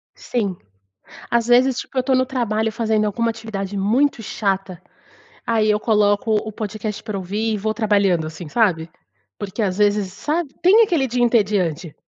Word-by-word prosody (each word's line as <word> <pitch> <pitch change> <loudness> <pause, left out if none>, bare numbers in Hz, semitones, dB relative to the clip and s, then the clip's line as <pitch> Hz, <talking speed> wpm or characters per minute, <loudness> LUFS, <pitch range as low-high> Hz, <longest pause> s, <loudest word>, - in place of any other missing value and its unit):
Sim. 205 -6 -2 0.7
Às 235 -1 +1
vezes, 250 +1 +4
tipo - - -8
eu 255 - +2
tô 265 +1 +1
no 255 0 +2
trabalho 225 -4 -1
fazendo 220 -1 0
alguma 230 +3 0
atividade 215 -3 -5
muito 230 +7 +1
chata, 195 -3 -2 0.6
aí 220 -2 +2
eu 210 0 +2
coloco 210 +1 +2
o 215 +1 -2
podcast 210 0 -5
pra 215 -3 -4
ouvir 205 +4 -2
e - - -1
vou 215 +2 -1
trabalhando 200 -7 +1
assim, 160 +1 -8
sabe? 170 -6 +1 0.5
Porque 205 +2 -4
às 190 -3 -1
vezes, 205 -2 +1
sabe? 300 - -2
Tem 395 +6 +6
aquele 330 -10 +1
dia 245 0 0
entediante. 195 -9 +1
215 Hz, 165 wpm, -21 LUFS, 200-235 Hz, 0.7 s, Tem